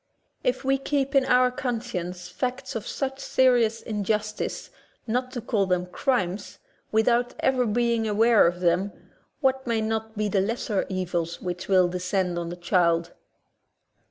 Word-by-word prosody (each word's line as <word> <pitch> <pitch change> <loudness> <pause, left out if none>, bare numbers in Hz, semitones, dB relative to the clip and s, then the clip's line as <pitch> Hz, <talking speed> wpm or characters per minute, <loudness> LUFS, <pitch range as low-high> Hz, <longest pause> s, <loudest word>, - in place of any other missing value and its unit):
If - - 0
we 270 0 +2
keep 275 0 -1
in 270 -2 +4
our 250 -1 +4
conscience 220 -9 -4
facts 255 +8 -4
of 225 -1 -5
such 270 -1 -3
serious 240 -5 +2
injustice, 210 0 -2 0.3
not 250 +3 -1
to 245 - -4
call 205 -4 0
them 180 -1 +1
crimes. 195 -1 -1 0.3
without 235 +3 +2
ever 255 -2 +2
being 230 0 +1
aware 220 -1 +5
of 175 +1 -2
them, 180 +3 +1 0.5
what 265 -1 +1
may 230 -1 +1
not 220 0 -2
be 215 0 0
the 195 -1 +2
lesser 210 -1 -1
evils 175 -3 -2
which 180 -1 -5
will 185 -2 +5
descend 180 0 -1
on 170 -1 -4
the 175 - -5
child? 170 -1 +1
220 Hz, 150 wpm, -26 LUFS, 180-245 Hz, 0.5 s, aware